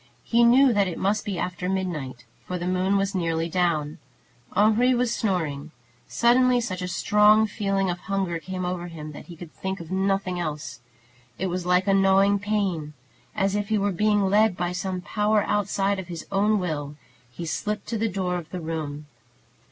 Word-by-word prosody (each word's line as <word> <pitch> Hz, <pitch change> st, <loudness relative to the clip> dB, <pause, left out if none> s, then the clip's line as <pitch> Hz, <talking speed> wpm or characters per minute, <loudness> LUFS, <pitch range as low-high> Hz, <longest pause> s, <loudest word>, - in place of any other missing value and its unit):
He 235 Hz, 0 st, +3 dB
knew 250 Hz, +2 st, +6 dB
that 200 Hz, -2 st, +2 dB
it 175 Hz, -, -4 dB
must 205 Hz, +3 st, 0 dB
be 195 Hz, -3 st, -3 dB
after 180 Hz, +1 st, -3 dB
midnight, 155 Hz, -10 st, -3 dB, 0.2 s
for 180 Hz, -, -3 dB
the 175 Hz, -, -4 dB
moon 185 Hz, +2 st, +1 dB
was 195 Hz, +1 st, 0 dB
nearly 165 Hz, -3 st, -1 dB
down. 160 Hz, -4 st, 0 dB, 0.6 s
Henri 220 Hz, +5 st, +4 dB
was 245 Hz, -1 st, +1 dB
snoring. 160 Hz, -10 st, -2 dB, 0.4 s
Suddenly 250 Hz, +1 st, +3 dB
such 195 Hz, -6 st, -4 dB
a 180 Hz, -, -3 dB
strong 210 Hz, +4 st, +4 dB
feeling 195 Hz, -2 st, -1 dB
of 175 Hz, -1 st, -2 dB
hunger 190 Hz, -4 st, -2 dB
came 185 Hz, +2 st, -5 dB
over 180 Hz, -1 st, -3 dB
him, 155 Hz, -3 st, -8 dB
that 145 Hz, -, -11 dB
he 175 Hz, -, -10 dB
could 165 Hz, -1 st, -11 dB
think 190 Hz, 0 st, -4 dB
of 170 Hz, 0 st, -9 dB
nothing 190 Hz, -1 st, 0 dB
else. 150 Hz, -7 st, -5 dB, 0.6 s
It 190 Hz, -1 st, -2 dB
was 180 Hz, 0 st, -3 dB
like 180 Hz, +1 st, +3 dB
a 195 Hz, -, +4 dB
gnawing 195 Hz, +1 st, +4 dB
pain. 195 Hz, -7 st, -2 dB, 0.4 s
As 195 Hz, 0 st, +1 dB
if 205 Hz, -1 st, -2 dB
he 220 Hz, -, +2 dB
were 200 Hz, 0 st, +1 dB
being 210 Hz, +2 st, +2 dB
led 205 Hz, 0 st, +3 dB
by 175 Hz, 0 st, -1 dB
some 185 Hz, 0 st, -3 dB
power 210 Hz, +2 st, +1 dB
outside 200 Hz, -1 st, 0 dB
of 185 Hz, -, -7 dB
his 170 Hz, -3 st, -7 dB
own 205 Hz, +2 st, +2 dB
will, 150 Hz, -6 st, -3 dB, 0.3 s
he 170 Hz, +8 st, -7 dB
slipped 210 Hz, +5 st, -3 dB
to 230 Hz, -, -1 dB
the 225 Hz, +1 st, +1 dB
door 180 Hz, -2 st, -2 dB
of 160 Hz, -, -11 dB
the 185 Hz, -, -5 dB
room. 155 Hz, -3 st, -5 dB
190 Hz, 190 wpm, -25 LUFS, 175-205 Hz, 0.6 s, knew